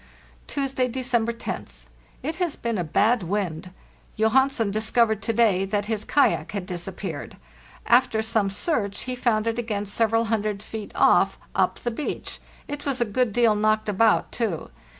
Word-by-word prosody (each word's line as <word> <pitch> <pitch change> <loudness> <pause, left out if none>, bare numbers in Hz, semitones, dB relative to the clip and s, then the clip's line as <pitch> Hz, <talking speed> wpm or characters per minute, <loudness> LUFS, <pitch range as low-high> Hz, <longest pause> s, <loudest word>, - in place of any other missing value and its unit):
"Tuesday, 270 -2 -1
December 240 -2 0
roth. - - -6 0.4
It 315 +4 -3
has 350 -4 0
been 230 -4 -2
a - - 0
bad 215 +9 +2
wind. 180 -2 -3 0.5
Johansen 225 0 +2
discovered 220 0 +2
to 230 - -1
day 215 -5 +3
that 205 +1 -1
his 215 -1 -2
kayak 285 -7 +2
had 200 -3 -3
disap 175 -1 -4
peared. - - -6 0.5
After 235 -2 +3
some 220 -2 +1
search 200 - -1
he 255 0 -4
found 225 -3 +1
it 230 +1 -1
again 210 -3 -2
several 225 +2 +2
hundred 210 -2 -1
feet 220 -1 -7
off, - - +4 0.2
up - - +1
the 240 - -3
beach; 285 +6 -4 0.3
it 290 0 -5
was 275 -3 -1
a 240 - +2
good 230 +2 0
deal 230 0 +4
knocked 215 +1 +1
about, 215 +2 +3
too. 205 - -3
220 Hz, 165 wpm, -24 LUFS, 205-240 Hz, 0.5 s, off